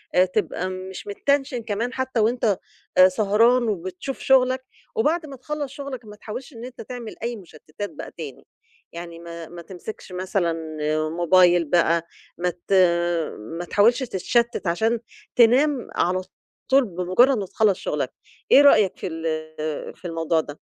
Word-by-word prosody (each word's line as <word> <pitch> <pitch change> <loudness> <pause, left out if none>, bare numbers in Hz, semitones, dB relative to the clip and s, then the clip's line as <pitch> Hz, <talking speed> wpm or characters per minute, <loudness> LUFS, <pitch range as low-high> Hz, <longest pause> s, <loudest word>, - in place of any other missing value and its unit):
آآ 180 - +6
تبقى 185 -1 -2
مش 185 +1 -7
متّنشن 270 +3 0
كمان 230 +3 -2
حتى 260 -2 -1
وأنت 220 -2 +2 0.4
آآ 185 0 +9
سهران 220 +5 +3
وبتشوف 185 +6 -4
شغلك. 260 0 +3 0.3
وبعد 345 -7 +1
ما 275 - -8
تخلص 290 +1 -4
شغلك 270 -4 -7
ما 210 - -11
تحاولش 240 +7 -8
إن 230 0 -8
أنت 255 -1 -9
تعمل 240 -1 -7
أي 240 0 -2
مشتتات 175 +1 -8
بقى - - -8
تاني. - - -8 0.5
يعني 170 0 -8
ما 170 -1 -8
ما 175 0 -9
تمسكش 185 +3 -9
مثلًا 180 -1 -1 0.6
موبايل 175 +1 +4
بقى 170 +1 +2 0.3
ما 180 +1 0 0.2
ت 200 - 0 0.6
ما 165 +12 -6
تحاولش 220 +8 +4
تتشتت 235 -1 0
عشان 220 +7 +1 0.4
تنام 250 +3 +4
على 185 +1 +1 0.5
طول 270 -1 +6
بمجرد 185 +8 +3
ما 200 - -2
تخلص 200 0 +1
شغلك. - - -2 0.4
إيه 280 - +9
رأيك 215 -9 +5
في - - -4
ال 155 -2 -4
في - - -18
الموضوع 165 -1 0
ده؟ 145 -1 -10
205 Hz, 150 wpm, -23 LUFS, 175-245 Hz, 0.6 s, آآ